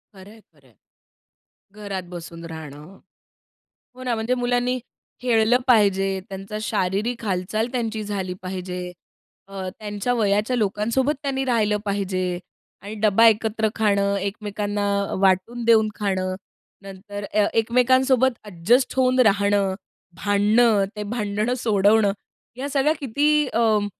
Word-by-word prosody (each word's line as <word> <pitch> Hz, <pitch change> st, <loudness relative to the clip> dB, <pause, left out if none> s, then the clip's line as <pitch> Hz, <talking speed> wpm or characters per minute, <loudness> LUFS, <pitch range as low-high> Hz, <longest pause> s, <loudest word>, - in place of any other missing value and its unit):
खरं 190 Hz, +2 st, -13 dB
आहे, 225 Hz, -, -16 dB
खरं 140 Hz, -3 st, -25 dB
आहे. 115 Hz, -, -26 dB, 1.0 s
घरात 200 Hz, -3 st, -5 dB
बसून 170 Hz, -1 st, -8 dB
राहणं. 160 Hz, +2 st, -10 dB, 1.0 s
हो 255 Hz, -, -11 dB
ना, 245 Hz, -2 st, -1 dB
म्हणजे 225 Hz, +3 st, -1 dB
मुलांनी 245 Hz, +1 st, 0 dB, 0.4 s
खेळलं 235 Hz, -1 st, +3 dB
पाहिजे, 200 Hz, -5 st, +4 dB, 0.2 s
त्यांचा 195 Hz, +2 st, -7 dB
शारीरिक 210 Hz, +5 st, -1 dB
हालचाल 200 Hz, +3 st, -1 dB
त्यांची 225 Hz, -3 st, -2 dB
झाली 190 Hz, -3 st, -3 dB
पाहिजे. 185 Hz, -1 st, -5 dB, 0.7 s
अ, 190 Hz, -1 st, -6 dB
त्यांच्या 210 Hz, +3 st, -3 dB
वयाच्या 215 Hz, +2 st, +1 dB
लोकांसोबत 230 Hz, +7 st, 0 dB
त्यांनी 270 Hz, -2 st, -1 dB
राहिलं 220 Hz, -5 st, +1 dB
पाहिजे. 195 Hz, -2 st, -1 dB, 0.6 s
आणि 205 Hz, +2 st, -7 dB
डब्बा 220 Hz, +2 st, +5 dB
एकत्र 220 Hz, 0 st, +1 dB
खाणं, 200 Hz, -2 st, +1 dB
एकमेकांना 205 Hz, 0 st, -3 dB, 0.2 s
अ, -, -, -3 dB
वाटून 195 Hz, +5 st, +1 dB
देऊन 220 Hz, -2 st, +5 dB
खाणं. 185 Hz, -3 st, -2 dB, 0.5 s
नंतर 200 Hz, +1 st, -8 dB
ए 210 Hz, -, +3 dB
एकमेकांसोबत 255 Hz, +3 st, +3 dB, 0.2 s
एडजस्ट 210 Hz, +8 st, +1 dB
होऊन 255 Hz, 0 st, +3 dB
राहणं, 200 Hz, -1 st, +2 dB, 0.5 s
भांडणं, 210 Hz, +1 st, +3 dB
ते 210 Hz, -, -4 dB
भांडणं 215 Hz, +1 st, -1 dB
सोडवणं. 210 Hz, -2 st, +3 dB, 0.4 s
या 275 Hz, +2 st, -4 dB
सगळ्या 285 Hz, +2 st, +2 dB
किती 295 Hz, +3 st, +2 dB
अं, 220 Hz, -3 st, +2 dB
210 Hz, 125 wpm, -23 LUFS, 195-240 Hz, 1.0 s, डब्बा